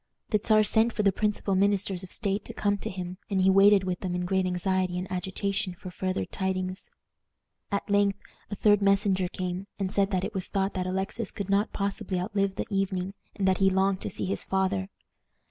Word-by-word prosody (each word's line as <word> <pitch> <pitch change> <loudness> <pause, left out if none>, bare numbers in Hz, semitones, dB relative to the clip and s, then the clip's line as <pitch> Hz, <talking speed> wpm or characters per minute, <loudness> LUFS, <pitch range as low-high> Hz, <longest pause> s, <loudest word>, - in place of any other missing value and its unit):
The 210 - +3
Czar 215 -1 +5
sent 220 +2 +4
for 210 - 0
the 200 - +5
principal 210 -1 -1
ministers 195 -1 +1
of 185 - -8
state 200 -1 -1
to - - -8
come 205 -1 +1
to - - -4
him, 185 0 -6
and 195 -2 +1
he 190 +1 +5
waited 195 0 +6
with 185 -1 -2
them 180 -2 -3
in 180 0 -1
great 190 0 +1
anxiety 185 0 0
and 180 - -2
agitation 190 +1 -2
for 185 0 -9
farther 185 - -2
tidings. 185 - -3 0.8
At 200 - -1
length 200 -1 +2 0.3
a 205 - -3
third 205 0 +4
messenger 195 -2 +3
came, 180 +2 -4
and 190 -2 -2
said 200 -1 +2
that 185 -1 0
it 210 - -5
was 190 -2 -3
thought 195 0 -1
that 185 -1 -2
Alexis 190 +4 -2
could 200 -1 -5
not 200 +2 +2
possibly 200 -1 -2
outlive 195 +1 -1
the - - -2
evening, 195 -1 -1 0.2
and 195 -2 0
that 185 -1 +2
he 195 -1 +5
longed 190 0 +1
to - - -3
see - - -3
his 190 - -1
father. 190 0 0
195 Hz, 210 wpm, -28 LUFS, 185-200 Hz, 0.8 s, waited